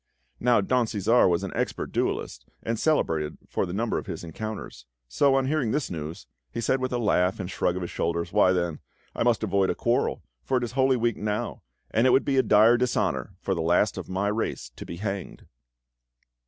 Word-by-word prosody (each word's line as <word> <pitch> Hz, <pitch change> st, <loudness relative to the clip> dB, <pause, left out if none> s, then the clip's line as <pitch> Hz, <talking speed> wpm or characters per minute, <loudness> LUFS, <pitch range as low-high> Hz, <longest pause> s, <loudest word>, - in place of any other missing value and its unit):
Now 120 Hz, -3 st, +4 dB
Don 125 Hz, +3 st, +1 dB
Cæsar 110 Hz, +1 st, +3 dB
was 85 Hz, +2 st, +1 dB
an 95 Hz, -, -4 dB
expert -, -, -2 dB
duellist, -, -, -2 dB, 0.2 s
and 115 Hz, -1 st, -2 dB
celebrated 80 Hz, -, +1 dB
for -, -, -1 dB
the -, -, -5 dB
number 115 Hz, +3 st, 0 dB
of -, -, -10 dB
his -, -, -5 dB
encounters; 85 Hz, -, -7 dB, 0.2 s
so 135 Hz, -, +3 dB
on 135 Hz, -1 st, +2 dB
hearing 140 Hz, -4 st, 0 dB
this 145 Hz, 0 st, -1 dB
news, 80 Hz, +2 st, -6 dB, 0.3 s
he 115 Hz, -, -4 dB
said 130 Hz, +3 st, +1 dB
with 130 Hz, 0 st, -2 dB
a 125 Hz, -, 0 dB
laugh 95 Hz, -5 st, +1 dB
and 90 Hz, -1 st, -4 dB
shrug 90 Hz, -, 0 dB
of 90 Hz, -, -3 dB
his 85 Hz, -, -5 dB
shoulders: 85 Hz, +1 st, -2 dB
"Why, 105 Hz, -3 st, +5 dB
then, 85 Hz, -3 st, -1 dB, 0.4 s
I -, -, -4 dB
must 115 Hz, -2 st, +2 dB
avoid 100 Hz, -2 st, +2 dB
a -, -, 0 dB
quarrel, -, -, 0 dB, 0.2 s
for 130 Hz, -, +1 dB
it 125 Hz, -, -1 dB
is 120 Hz, -, -3 dB
Holy 130 Hz, 0 st, +3 dB
Week 120 Hz, -1 st, 0 dB
now, 105 Hz, 0 st, -3 dB, 0.3 s
and 115 Hz, +4 st, +3 dB
it -, -, +5 dB
would 130 Hz, -, +4 dB
be 135 Hz, -1 st, +1 dB
a -, -, +7 dB
dire 110 Hz, +1 st, +5 dB
dishonour 125 Hz, 0 st, -1 dB
for -, -, -1 dB
the 85 Hz, -, -2 dB
last 90 Hz, +5 st, +2 dB
of -, -, -7 dB
my 95 Hz, +2 st, -1 dB
race 105 Hz, -, -3 dB
to -, -, -9 dB
be 85 Hz, -, -6 dB
hanged!" 100 Hz, 0 st, -5 dB
105 Hz, 215 wpm, -26 LUFS, 90-120 Hz, 0.4 s, a